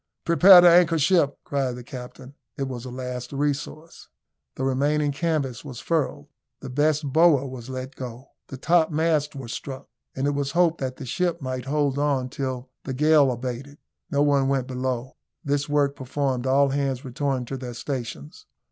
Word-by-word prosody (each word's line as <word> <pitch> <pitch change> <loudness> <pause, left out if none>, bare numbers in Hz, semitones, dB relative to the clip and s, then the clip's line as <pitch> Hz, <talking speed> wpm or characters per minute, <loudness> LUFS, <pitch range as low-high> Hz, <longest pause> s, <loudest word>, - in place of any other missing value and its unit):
"Prepare 180 +2 +8
to 175 - +7
anchor 170 -1 +5
ship!" 150 -2 +2
cried 135 -3 -1
the 125 - -9
captain. 125 +2 -10 0.2
It 140 - -2
was 130 -2 -5
a - - -6
last 125 0 -6
resource. 145 +3 -4 0.5
The 130 - -4
remaining 145 +3 +1
canvas 140 -5 -2
was 130 -5 -8
furled. 135 - -1 0.3
The - - -8
best 145 0 +1
bower 160 -4 +5
was 130 -2 -8
let 130 +1 -6
go; 125 +1 -8 0.2
the 135 - -8
topmasts 160 -1 +1
were 135 -3 -7
struck; 130 +4 -7 0.3
and 135 - -1
it 145 - +2
was 140 0 -2
hoped 170 -1 +3
that 130 -1 -3
the 135 - -8
ship 175 +6 -1
might 130 -2 -4
hold 140 -1 0
on 140 -3 0
till 130 -2 -5
the 130 - -4
gale 150 -1 +4
abated. 130 +3 -6 0.3
No 145 0 +2
one 140 -2 +3
went 135 -2 0
below. 130 -1 -4 0.3
This 145 +1 -1
work 145 -1 +2
performed, 130 -1 -2
all 140 +1 +4
hands 135 -1 -2
returned 130 -1 -2
to 135 - -3
their 125 -2 -7
stations. 120 - -6
135 Hz, 175 wpm, -24 LUFS, 130-150 Hz, 0.5 s, Prepare